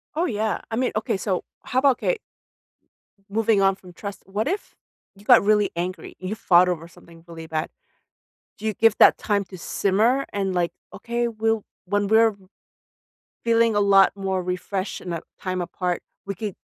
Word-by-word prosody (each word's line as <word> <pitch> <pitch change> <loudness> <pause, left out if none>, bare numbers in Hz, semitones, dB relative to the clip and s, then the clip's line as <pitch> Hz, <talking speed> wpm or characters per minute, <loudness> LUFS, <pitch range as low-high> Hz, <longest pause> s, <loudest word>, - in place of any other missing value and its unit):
Oh, 335 +3 +1
yeah. 220 - -1
I - - -1
mean, 250 +2 0
okay. 215 -2 -1
So 190 -2 -2 0.2
how 255 - 0
about, 265 -2 +4
'kay - - 0 1.1
moving 215 0 +2
on 195 0 +4
from 180 -2 -15
trust, 200 +2 -8
what 205 +5 -2
if 390 +6 -3 0.4
you 200 +1 -18
got 245 -4 +7
really 210 -1 +3
angry? 180 +2 -4
You 185 +3 -4
fought 180 -3 +4
over 165 -2 -3
something 165 0 -17
really 165 -1 -9
bad. 155 -1 -2 0.9
Do 215 - -9
you 215 - 0
give 225 +1 +3
that - - +7
time 205 -1 0
to 185 0 -11
simmer 220 +10 +1
and, 195 -2 -1
like, 175 -1 0 0.2
"Okay, 240 0 -2
we'll 225 -1 0 0.2
when 205 +2 0
we're 220 0 +4 1.1
feeling 230 -1 +3
a - - +4
lot 195 -1 +5
more 190 -1 -1
refreshed 185 +2 -3
in 180 - -7
that 170 -1 -4 0.2
time 185 -1 -2
apart, 180 0 -2 0.2
we 200 - -3
could 205 0 -5
200 Hz, 175 wpm, -24 LUFS, 185-225 Hz, 1.1 s, got